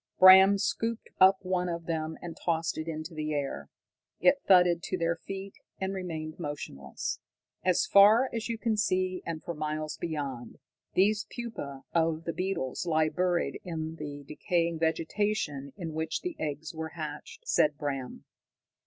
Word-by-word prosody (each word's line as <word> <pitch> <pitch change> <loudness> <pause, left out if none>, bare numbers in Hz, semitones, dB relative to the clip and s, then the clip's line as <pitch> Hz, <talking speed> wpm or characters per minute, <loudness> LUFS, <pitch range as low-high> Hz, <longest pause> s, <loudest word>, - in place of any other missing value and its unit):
Bram 190 +2 +9
scooped 225 +3 -2
up 190 +1 +7
one 180 -1 0
of 170 -1 -4
them 160 -1 -2
and 170 -2 -6
tossed 165 -1 -1
it 155 - -4
into 160 +1 -5
the 155 -1 -2
air. 140 -2 -3 0.5
It 275 0 +4
thudded 180 -3 +6
to 185 - -2
their 170 -1 +1
feet 195 +2 -7 0.3
and 190 0 -2
remained 160 -5 -5
motionless. 135 - -5 0.4
"As 185 -1 +3
far 215 +6 +7
as 230 0 -3
you 230 - -1
can 225 -1 0
see, 185 -2 +1
and 160 -2 -4
for 170 - -4
miles 155 0 -3
beyond, 140 -7 -4 0.4
these 210 +3 +3
pupae 145 - -6
of 165 -1 +1
the 165 - -3
beetles 180 -5 -2
lie 155 -1 +3
buried 180 +1 0
in 160 -2 -4
the 145 -2 -7
decaying 170 +2 0
vegetation 160 -3 -1
in 165 -4 -5
which 160 0 -2
the 360 -2 -4
eggs 150 0 -4
were 160 -1 -5
hatched," 155 - -7
said 150 - +3
Bram. 140 -4 -4
165 Hz, 155 wpm, -29 LUFS, 155-190 Hz, 0.5 s, Bram